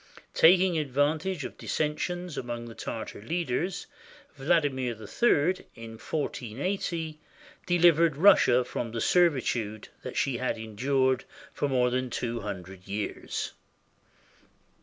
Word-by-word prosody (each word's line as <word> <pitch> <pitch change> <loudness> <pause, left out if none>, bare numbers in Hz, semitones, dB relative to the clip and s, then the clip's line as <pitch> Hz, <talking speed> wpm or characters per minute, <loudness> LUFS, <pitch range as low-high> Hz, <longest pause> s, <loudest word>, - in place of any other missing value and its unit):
Taking 180 0 +5
advantage 150 +4 0
of - - -8
dissensions 175 +3 -2
among 120 -2 -4
the 115 - -9
Tartar 110 -2 -6
leaders, 170 - -2 0.5
Vladimir 135 -4 +1
III, 155 - +1
in 115 -1 -10
1480, 155 - -3 0.5
delivered 170 -3 +4
Russia 135 -8 +6
from 115 -2 -4
the 115 - -2
servitude 120 -10 +1
that - - -6
she 135 -3 +1
had 130 0 -1
endured 130 +4 0 0.3
for 145 - -1
more 125 -2 +2
than 130 0 -1
two 120 0 -3
hundred 95 -2 -7
years. 100 +1 -3
135 Hz, 110 wpm, -28 LUFS, 115-165 Hz, 0.5 s, Russia